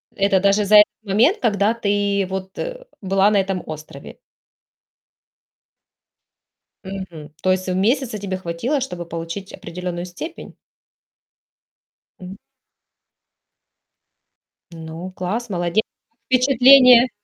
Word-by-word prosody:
Это 195 -1 +2
даже 200 +2 +2
за 210 - +4
этот 210 - +8 0.2
момент, 225 - +2
когда 210 -1 +1
ты 200 -2 0
вот, 190 0 -6
э, - - -6 0.2
была 195 +1 +2
на 210 - +2
этом 190 -1 -2
острове. 155 -3 -10 2.7
Мгм. 175 -6 -8
То 185 - +3
есть 185 0 -1
месяца 215 +5 0
тебе 190 -2 -4
хватило, 185 - -2
чтобы 180 -10 -5
получить 170 +4 -7
определённую 175 +1 -6
степень? 310 - -9 1.7
М. 190 +3 -10 2.3
Ну, 165 +2 -8
класс, 210 +7 -4
молодец! 175 +2 0 0.3
Как 230 - -47
впечатления? 255 0 +6
195 Hz, 100 wpm, -20 LUFS, 180-230 Hz, 2.7 s, этот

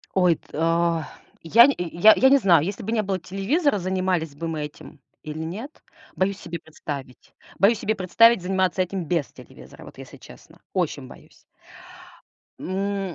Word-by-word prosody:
Ой, 180 -3 +4
та 165 +1 -1 0.4
я 230 +9 +7
нь 280 - +3
й 175 -1 -4
я 220 +2 +9
я 265 - +5
не 280 - +6
знаю, 175 - +4
если 200 - -5
бы 215 - -4
не 220 -2 0
было 190 -1 -2
телевизора, 210 - 0
занимались 185 -5 -2
бы 165 +3 -5
мы 160 -2 -4
этим 150 0 -11 0.2
или 155 +1 -7
нет. 220 - -8 0.3
Боюсь 195 +1 -1
себе 170 0 -7
представить. 145 -5 -9 0.3
Боюсь 210 +3 +4
себе 220 - -1
представить, 210 +4 +4
заниматься 185 0 0
этим 185 -1 -3
без 160 -4 -1
телевизора. - - -15
Вот, - - -14
если - - -12
честно. - - -16
Очень - - -2
боюсь. - - -17 1.1
М, 195 -1 -3
185 Hz, 165 wpm, -23 LUFS, 165-200 Hz, 1.1 s, я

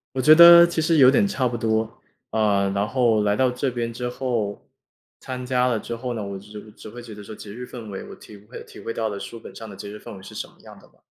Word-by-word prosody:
我 130 - 0
觉 155 +4 +7
得 170 +1 +10
其 170 -1 -2
实 160 0 +2
有 130 -2 +8
点 205 - +3
差 130 -10 -1
不 120 - -4
多， 110 -1 -2 0.3
呃， 100 -3 +1
然 100 +1 0
后 115 -3 +2
来 105 0 +1
到 130 +1 +2
这 125 +2 -2
边 120 -2 -4
之 125 +1 -4
后 120 -6 -3 0.5
参 125 -1 -6
加 125 0 +1
了 120 -3 0
之 115 - -6
后 125 +1 -5
呢， 110 - -4
我 100 -1 -6
只 105 +1 -12
只 110 - -12
会 120 +3 -10
觉 115 -2 -11
得 105 0 -11
说 110 - -10
节 105 - -11
日 125 +3 -8
氛 120 -4 -10
围， 95 - -6
我 - - -10
体 105 - -14
会 105 +5 -12
体 - - -14
会 - - -5
到 115 -1 -2
的 100 -2 -5
书 115 - -8
本 - - -13
上 110 -1 -9
的 100 - -10
节 100 +1 -9
日 105 - -9
氛 115 0 -11
围 95 - -14
是 - - -12
什 - - -5
么 - - -23
样 - - -14
的 - - -20
吧， - - -31
115 Hz, 305 characters per minute, -23 LUFS, 105-125 Hz, 0.5 s, 得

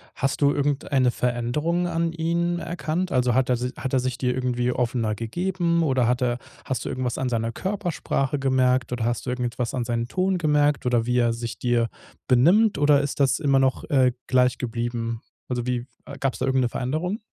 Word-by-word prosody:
hast 135 +1 -1
du 140 0 +4
irgendeine 140 -3 +1
Veränderung 135 +10 -1
an 165 -1 -1
ihn 170 +1 0
erkannt? 170 +1 -3
Also 125 -2 +2
hat 130 +1 +2
er 125 - +3
si 125 +1 -2
hat 130 - -4
er 130 - +3
sich 125 0 -2
dir 125 -1 0
irgendwie 125 -1 0
offener 120 -3 0
gegeben 170 - -1
oder 130 -6 +2
hat 125 +2 +1
er 125 -1 +1 0.3
hast 130 - -3
du - - -3
irgendwas 125 -2 -2
an 130 - -1
seiner 115 -2 -1
Körpersprache 175 - -2
gemerkt 130 -2 +2
oder 120 - -2
hast 120 -3 -1
du 125 - -3
irgendetwas 125 -1 -2
an 125 - -1
seinen 115 0 -2
Ton 185 +5 0
gemerkt 150 -3 +2
oder 120 -2 +2
wie 125 0 +1
er 120 -1 +3
sich 115 0 -6
dir 120 -2 +1 0.4
benimmt 180 - +5
oder 145 -1 +4
ist 145 0 -4
das 135 0 +3
immer 140 -3 +3
noch, 135 -1 +1
äh, 130 -3 +3
gleich 125 -1 +3
geblieben? 115 -1 -3 0.3
Also 120 -1 -2
wie 125 -1 -2 0.4
gab's 135 -2 -1
da 130 - 0
irgend 130 -1 +2
'ne 125 - +1
Veränderung? 155 - -2
130 Hz, 195 wpm, -24 LUFS, 120-150 Hz, 0.4 s, benimmt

